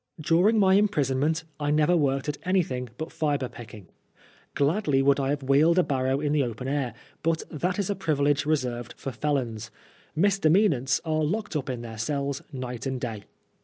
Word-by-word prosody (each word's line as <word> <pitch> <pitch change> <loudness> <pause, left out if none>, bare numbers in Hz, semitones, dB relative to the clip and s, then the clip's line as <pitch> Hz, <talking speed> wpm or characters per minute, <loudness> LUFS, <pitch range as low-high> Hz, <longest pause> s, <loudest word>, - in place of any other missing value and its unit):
During 175 +8 +3
my 190 -2 +5
imprisonment 160 -6 +2 0.2
I 145 -1 -1
never 150 +3 +3
worked 140 -3 +1
at 145 -1 -3
any 185 0 +2
thing 125 -7 -5
but 160 +2 -5
flbre 145 -4 -1
picking. 110 -4 -11 0.7
Oladly 145 -2 +2
would 140 +1 +4
I 135 -1 0
have 145 -1 -1
wheeled 145 +6 +4
a 180 - +5
barrow 130 -1 0
in 145 -1 -1
the 150 - +3
open 125 0 -3
air, 135 -3 -1 0.3
but 165 -1 0
that 180 +5 -1
is 200 -1 -1
a - - -1
privilege 145 -5 +1
reserved 125 -6 -2
for 135 - -5
felons; 120 -5 -2 0.5
misdemeanants 175 - +3
are 155 -1 0
locked 210 +5 -2
up 140 -4 -2
in 120 -2 -4
their 110 -2 -8
cells 140 +3 -2
night 125 -2 -5
and 130 -1 -2
day. 110 -5 -5
145 Hz, 180 wpm, -26 LUFS, 130-160 Hz, 0.7 s, my